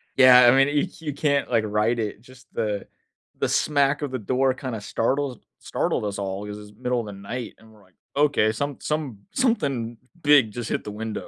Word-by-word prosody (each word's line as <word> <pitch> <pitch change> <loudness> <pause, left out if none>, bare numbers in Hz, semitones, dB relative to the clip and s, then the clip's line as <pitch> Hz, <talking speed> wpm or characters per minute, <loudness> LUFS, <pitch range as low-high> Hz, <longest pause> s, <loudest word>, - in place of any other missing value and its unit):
Yeah, 125 -1 +8
I 120 - +8
mean, 135 +1 +5
y 145 +5 +1
you 150 - -3
can't, 140 -2 0
like, 115 -3 +2
write 105 +3 +1
it. 105 0 -3
Just 130 0 -17
the 105 -2 -2 0.5
the - - 0
smack 140 0 +2
of 140 - -3
the 130 - -3
door 130 +4 +1
kinda 125 -4 -5
startles 130 +4 -1 0.2
startled - - -1
us 100 0 -3
all 100 +1 -4
‘cause 105 0 -6
it's 105 0 -13
middle 125 -1 0
of 110 - -8
the 100 - -7
night, 110 +5 -6
and 110 0 -19
we're 105 - -20
like, 90 -2 -27 0.2
"Okay, 140 -7 +3
some 140 +4 -3
some 150 -9 -3
something 140 - 0 0.2
big 145 -7 +5
just 120 0 -5
hit - - -1
the 105 - -6
window." 110 +1 -5
125 Hz, 210 wpm, -24 LUFS, 105-140 Hz, 0.5 s, Yeah